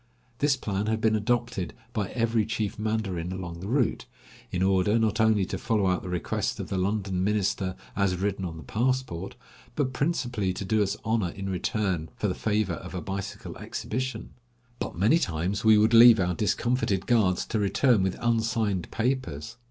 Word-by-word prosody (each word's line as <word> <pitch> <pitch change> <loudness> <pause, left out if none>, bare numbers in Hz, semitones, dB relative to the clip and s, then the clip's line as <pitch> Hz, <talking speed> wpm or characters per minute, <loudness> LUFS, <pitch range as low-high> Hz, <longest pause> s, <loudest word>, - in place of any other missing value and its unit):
This 145 -1 +3
plan 100 -3 -2
had 110 0 0
been 110 0 +2
adopted 120 -3 -1 0.2
by 105 -5 -1
every 115 -2 +1
chief 110 -1 -3
mandarin 100 -6 -2
along 90 -2 -6
the 95 - -6
route, 125 +1 0 0.4
in 90 - 0
order, 95 +3 +3
not 110 -1 +1
only 110 -3 +3
to - - -4
follow 110 -4 +1
out 90 -1 +1
the 90 - -7
request 90 -2 -2
of - - -5
the 95 - -1
London 95 -1 -1
minister 100 -2 0 0.2
as 100 -2 +1
written 95 +1 -2
on 85 -3 -4
the 80 - -9
passport, 115 - -1 0.4
but 135 -3 0
principally 125 - -1
to 100 - -5
do 110 +2 +2
us 100 +1 0
honor 110 -5 +1
in 95 +3 -6
return 90 -3 -1
for - - -1
the - - 0
favor 105 -4 0
of 90 +2 -7
a - - -2
bicycle 100 +2 -5
exhibition; 130 0 -4 0.5
but - - -4
many 110 - +4
times 90 - -1
we 110 -1 +7
would 110 +2 +4
leave 115 -1 +9
our 90 -1 +1
discomfited 105 0 0
guards 105 -7 +2
to 110 - -2
return 105 +2 +3
with 95 -1 -1
unsigned 110 -5 0
papers. 115 - -2
105 Hz, 180 wpm, -27 LUFS, 95-115 Hz, 0.5 s, leave